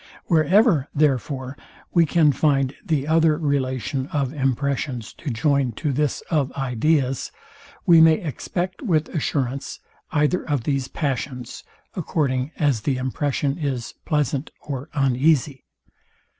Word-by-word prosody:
Wherever, 165 - +4
therefore, 135 -2 0 0.4
we 170 -2 +4
can 155 -1 +4
find 135 -1 +1
the 150 -4 -1
other 160 -1 +3
relation 135 -2 -1
of 140 -3 -2
impressions 135 -3 -2
to 155 - -6
join 140 0 +1
to 145 +5 -2
this 145 +1 0
of 145 -5 +1
ideas, 135 +1 0 0.5
we 165 -2 +7
may 160 0 +7
expect 180 +2 -4
with 165 - +1
assurance 140 -3 -2 0.3
either 150 +4 +2
of 145 -5 0
these 135 -1 -1
passions, 130 -4 -4 0.3
according 140 -6 -1
as 140 -8 +1
the 130 +4 0
impression 140 +3 -1
is 135 -6 -3
pleasant 150 -1 -1
or 140 0 -6
uneasy. 135 0 +2
140 Hz, 120 wpm, -23 LUFS, 130-155 Hz, 0.5 s, we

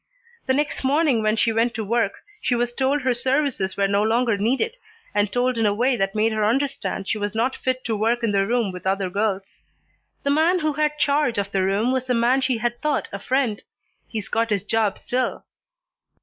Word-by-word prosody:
The 260 - +3
next 295 0 -1
morning 275 -3 +2
when 215 0 +2
she 225 +1 +2
went 230 +1 +1
to 220 - -2
work 230 -1 -1 0.2
she 245 - +1
was 240 0 -1
told 270 +2 0
her 255 -1 +2
services 260 -5 -1
were 200 0 +2
no 200 +1 +2
longer 230 +1 +2
needed, 260 - 0 0.4
and 205 -1 +1
told 245 -1 0
in 225 - +2
a 205 - +1
way 250 +4 +2
that 195 -3 -1
made 220 +1 +2
her 215 -1 0
understand 265 -3 -1
she 215 - -1
was 205 +1 -3
not 245 +4 +1
fit 255 0 -2
to 225 - -1
work 230 +3 0
in 225 - +2
the 195 -1 +1
room 235 -3 +1
with 180 0 -7
other 190 -1 0
girls. 200 -1 -2 0.6
The 280 - +1
man 320 +5 +3
who 310 -3 0
had 300 0 0
charge 285 -5 +1
of 200 0 -2
the 195 - +1
room 200 +6 +1
was 260 -1 -1
the 250 - +1
man 240 +3 +3
she 260 -2 +1
had 240 +1 -2
thought 300 -1 -1
a 200 - -4
friend. 250 -2 0 0.5
He's 220 -2 -5
got 230 +1 0
his 200 -3 0
job 215 -1 0
still." 255 +1 -2
235 Hz, 220 wpm, -23 LUFS, 205-260 Hz, 0.6 s, The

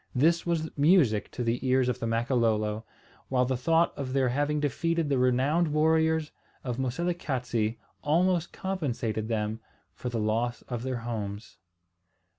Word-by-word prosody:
This 165 +7 +3
was 165 -2 0
music 145 - +4
to 125 - -4
the 115 +1 -1
ears 130 -1 +3
of 125 - -1
the 115 - -2
Makololo, 115 -2 +1 0.5
while 125 -1 +2
the 130 +1 0
thought 165 +6 +2
of 130 -2 -4
their 135 -2 +2
having 145 +4 0
defeated 165 +2 0
the 135 -2 +2
renowned 130 +7 +2
warriors 160 0 +2 0.3
of 125 -1 -3
Moselekatse 130 - -1 0.3
almost 170 +3 +2
compensated 125 - -2
them 110 -1 -2 0.3
for 125 - -5
the 120 - -3
loss 115 +3 -1
of 120 -2 -5
their 130 -2 -3
homes. 105 -2 -5
130 Hz, 145 wpm, -28 LUFS, 115-160 Hz, 0.5 s, music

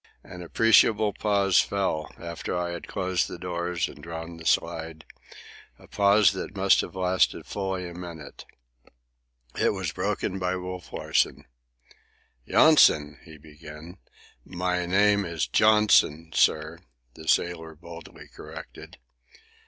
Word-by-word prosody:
An 90 - -11
appreciable 110 +2 +3
pause 100 -2 +2
fell 95 -6 -1
after 85 +1 -5
I 90 0 -2
had 85 -1 -7
closed 95 -1 -1
the - - -8
doors 85 -1 -3
and 75 - -13
drawn 85 +1 -8
the 80 - -7
slide, 80 -1 -1 0.7
a - - -18
pause 100 0 +4
that 100 +1 -7
must 95 0 +4
have - - -9
lasted 95 0 0
fully 95 -2 -4
a 85 - -9
minute. 85 -3 -10 1.2
It - - +2
was - - -4
broken 95 - -3
by 90 0 -1
Wolf 90 -1 -7
Larsen. - - -1 1.0
"Yonson," 75 - +4
he 80 -1 -13
began. 75 +3 -13 0.4
"My 90 +1 -2
name 100 +2 +3
is 85 -6 -2
Johnson, 85 - +3
sir," 80 +2 +1 0.3
the 80 - -13
sailor 80 -1 0
boldly 85 +2 -12
corrected. - - -12
90 Hz, 125 wpm, -26 LUFS, 80-95 Hz, 1.2 s, pause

